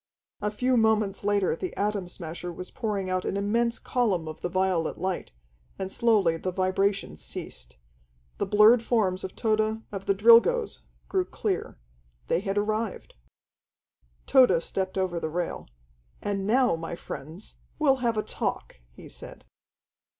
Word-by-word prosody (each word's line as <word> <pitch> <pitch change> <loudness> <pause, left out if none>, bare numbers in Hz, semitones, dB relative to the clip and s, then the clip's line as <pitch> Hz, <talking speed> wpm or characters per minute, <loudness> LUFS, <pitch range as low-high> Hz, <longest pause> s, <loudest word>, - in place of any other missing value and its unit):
A 210 - 0
few 250 +4 +1
moments 215 -3 +2
later 200 -2 +2
the 370 - -6
Atom 205 -2 -1
Smasher 175 0 -6
was 180 +2 -8
pouring 210 -5 -2
out 185 0 -1
an 195 - -2
immense 230 +4 +1
column 200 -10 0
of 155 - -8
the 175 - -2
violet 185 -3 0
light, 185 -1 -3 0.5
and 190 0 -4
slowly 205 -9 +3
the 185 - -3
vibration 185 - 0
ceased. 60 -5 -7 0.6
The - - 0
blurred 215 +3 +6
forms 210 -6 0
of 190 - -6
Tode, 220 0 0
of 195 -1 -6
the 195 - +3
Drilgoes 235 - +5 0.3
grew 375 -2 0
clear. 195 - -3 0.5
They - - +2
had 195 +1 -3
arrived. 215 +1 -2 1.1
Tode 245 -11 +5
stepped 190 0 -3
over 185 -2 0
the 160 - -3
rail. 175 +2 -3 0.5
"And 200 -1 -2
now, 245 -3 +3
my 165 +1 -5
friends, 165 +4 -8 0.2
we'll 275 -3 +3
have 235 -3 0
a 215 - +1
talk," - - -4
he - - -14
said. - - -12
200 Hz, 150 wpm, -27 LUFS, 185-225 Hz, 1.1 s, blurred